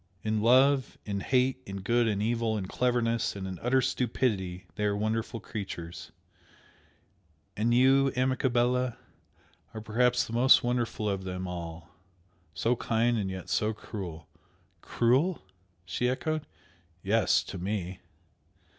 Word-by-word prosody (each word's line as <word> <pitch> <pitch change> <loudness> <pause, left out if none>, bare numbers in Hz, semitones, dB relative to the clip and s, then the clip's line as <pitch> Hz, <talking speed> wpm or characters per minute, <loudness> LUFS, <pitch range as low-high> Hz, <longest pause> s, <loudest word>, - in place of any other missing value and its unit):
In 110 0 0
love? 130 +3 +4
in 100 -1 -2
hate, 130 +3 +1
in 100 -3 -7
good, 120 +4 +2
in 105 -1 0
evil, 115 -1 0
in 95 - -3
cleverness 120 -1 0
and 95 -1 -5
in 95 -1 -6
utter 130 +2 +3
stupidity, 105 -8 -1
they 105 - -2
are 100 0 +1
wonderful 110 +2 -2
creatures! 85 -7 -7 1.4
And 115 +3 +1
you, 135 +2 +5
amica 130 +1 +1
bella, 125 0 +1 0.8
are 110 - -5
perhaps 125 +3 +2
the 115 - -8
most 125 +3 +6
wonderful 120 -3 -1
of 100 -2 -1
them 90 0 -4
all! 85 -2 -7 0.6
So 120 +2 +1
kind 115 +1 +1
and 100 -4 -1
yet 95 -1 -6
so 110 0 0
cruel!" 90 -8 -7 0.5
"Cruel?" 130 - +1 0.4
she 125 +6 -1
echoed. 155 +4 -2 0.6
"Yes! - - +3
To 95 - -7
me!" 95 -1 -3
115 Hz, 135 wpm, -29 LUFS, 100-125 Hz, 1.4 s, most